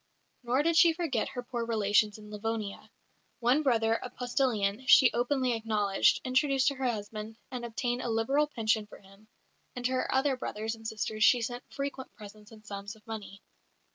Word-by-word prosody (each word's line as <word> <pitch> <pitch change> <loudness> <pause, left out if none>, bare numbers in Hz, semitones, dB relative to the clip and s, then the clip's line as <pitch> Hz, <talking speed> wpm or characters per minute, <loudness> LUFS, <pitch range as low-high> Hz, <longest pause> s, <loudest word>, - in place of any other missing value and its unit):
Nor 255 +3 +1
did 335 +1 +2
she 335 0 +7
forget 320 -9 -1
her 245 -1 -6
poor 240 -1 -4
relations 210 -2 +2
in 210 0 -13
Livonia. 210 -1 -4 0.5
One 250 +5 +3
brother, 225 -5 +2
a 250 - -6
postillion, 245 -3 -1
she 255 0 +7
openly 250 +1 +1
acknowledged, 215 -3 +2
introduced 265 +1 +2
to - - -4
her 260 -1 -1
husband, 215 0 -5
and 250 -2 -5
obtained 245 +1 -2
a 240 - -3
liberal 270 +7 +1
pension 220 -5 0
for - - -13
him; 195 +2 -20 0.5
and 245 -1 -5
to 255 - +2
her 255 - -1
other 270 +1 +2
brothers 220 -2 -4
and 225 -1 -8
sisters 215 0 -2
she 240 +1 +5
sent 245 +2 -5
frequent 275 -1 -5
presents 210 0 -13
and 215 -1 -15
sums 200 0 -7
of 215 - -22
money. 210 -3 -8
230 Hz, 180 wpm, -30 LUFS, 215-255 Hz, 0.5 s, she